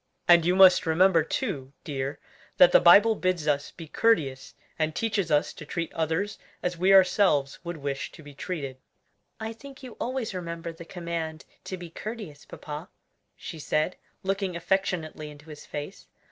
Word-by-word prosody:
And 170 -2 +7
you 180 - +3
must 185 -3 +7
remember 170 +1 +4
too, 145 - -3
dear, 135 -1 -4 0.4
that - - +8
the - - +7
Bible 225 - +7
bids 185 -6 -1
us 145 -1 +1
be 165 - -11
courteous, 145 -10 +1 0.2
and 155 0 0
teaches 210 -6 -1
us 150 -1 +2
to - - -10
treat 165 +2 -4
others 165 +6 -1 0.2
as 180 0 -1
we 185 +3 +2
ourselves 185 -7 +4
would 175 -1 -5
wish 140 -2 -4
to 155 - -13
be 145 0 -12
treated." 140 -4 -5 0.6
"I 220 0 -4
think 270 +3 -13
you 250 -3 -10
always 250 -3 -2
remember 170 -2 -5
the 165 +1 -11
command 170 -3 -5 0.2
to 185 - -5
be 175 -2 -9
courteous, 210 -8 -7
papa," 150 +4 -8 0.5
she 165 - -8
said, 155 +4 0 0.3
looking 195 -1 -1
affectionately 170 -3 -2
into 150 +1 -13
his 150 - -11
face. 145 0 -7
170 Hz, 165 wpm, -27 LUFS, 150-195 Hz, 0.6 s, that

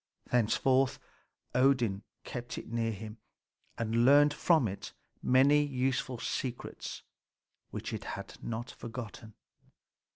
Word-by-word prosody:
Thenceforth 130 +3 +3 0.6
Odin 125 -6 +3 0.2
kept 120 0 -6
it - - -7
near 115 -1 0
him, 110 +1 -8 0.6
and 115 +1 +1
learned 145 +3 +7
from 155 -4 +3
it 95 -11 -6 0.3
many 140 +3 +5
useful 130 -2 -1
secrets 120 +1 -4 0.7
which - - -5
it - - -5
had - - -8
not 115 +1 -4
forgotten. 115 -2 -8
120 Hz, 105 wpm, -31 LUFS, 115-135 Hz, 0.7 s, learned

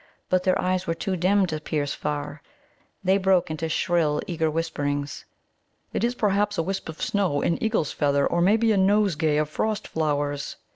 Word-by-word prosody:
But 185 0 +3
their 185 -1 +2
eyes 185 0 0
were 165 - 0
too 190 +2 -2
dim 190 +3 +3
to 155 -4 -3
pierce 150 -2 -2
far. 145 0 -4 0.6
They 190 +1 +3
broke 190 -4 +2
into 160 +1 -3
shrill, 160 -3 +1
eager 160 -3 -1
whisperings. 145 -3 -3 0.7
"It - - -1
is, 240 +1 +1
perhaps, 205 -1 +1
a 165 - +1
wisp 190 0 -4
of 160 - -8
snow, 185 -9 0
an 170 - 0
eagle's 220 -9 0
feather, 140 -1 +1
or 170 - +1
maybe 220 +5 +4
a 210 - +2
nosegay 190 -6 +2
of 150 0 +1
frost 215 +7 -2
flowers." 145 -2 -2
170 Hz, 180 wpm, -25 LUFS, 150-195 Hz, 0.7 s, maybe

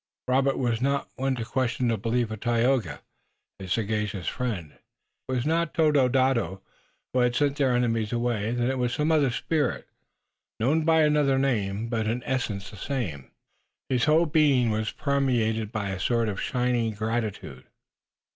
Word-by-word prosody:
Robert 135 +1 +2
was 120 -3 0
not 140 +1 0
one 135 0 -1
to 115 -2 -4
question 125 -1 0
the 115 - +2
belief 115 +2 -1
of 110 - -5
Tayoga, 120 +1 +1 0.6
his 95 -2 -7
sagacious 105 -3 -1
friend. 105 - -3
If - - -26 0.5
it - - -4
was 125 -1 -1
not 165 +1 0
Tododaho 130 - +2 0.5
who 130 - +2
had 125 -1 +2
sent 145 0 +1
their 130 -3 +2
enemies 115 -3 0
away 120 -3 -1
then 120 0 0
it 130 - -3
was 120 -1 0
some 150 +4 +1
other 150 -4 +3
spirit, 145 +2 -1 0.7
known 150 +8 +2
by 160 -1 +4
another 150 -3 +3
name, 110 -5 0
but 115 -2 -1
in 120 +2 -2
essence 115 -7 -3
the 105 - -11
same. 95 - -4 0.6
His 130 +1 +2
whole 160 +2 +4
being 145 -7 +3
was 110 0 -1
permeated 120 -6 0
by 105 -4 -3
a 95 -1 -4
sort 115 +3 +1
of 100 - -4
shining 125 -3 0
gratitude. 110 - -4
120 Hz, 165 wpm, -26 LUFS, 110-135 Hz, 0.7 s, by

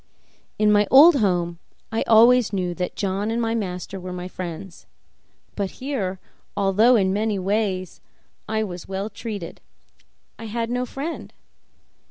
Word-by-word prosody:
In 210 0 +3
my 210 0 +4
old 295 +4 +8
home 175 -6 0 0.3
I 225 - -1
always 235 +1 +6
knew 180 -3 -1
that 180 0 -4
John 200 +1 -2
and 230 +1 -1
my 225 -1 0
master 190 -3 -4
were 180 0 -7
my 180 0 -5
friends; 185 0 -8 0.7
but 200 -2 -3
here, 215 -9 -3 0.4
although 205 +5 +4
in 190 -4 +2
many 210 0 0
ways 190 -2 -2 0.5
I 220 0 0
was 180 -4 -7
well 195 +3 -4
treated, 205 -7 -7 0.8
I 225 - -7
had 230 +1 -3
no 250 0 -1
friend. 290 +7 -6
205 Hz, 145 wpm, -23 LUFS, 185-225 Hz, 0.8 s, old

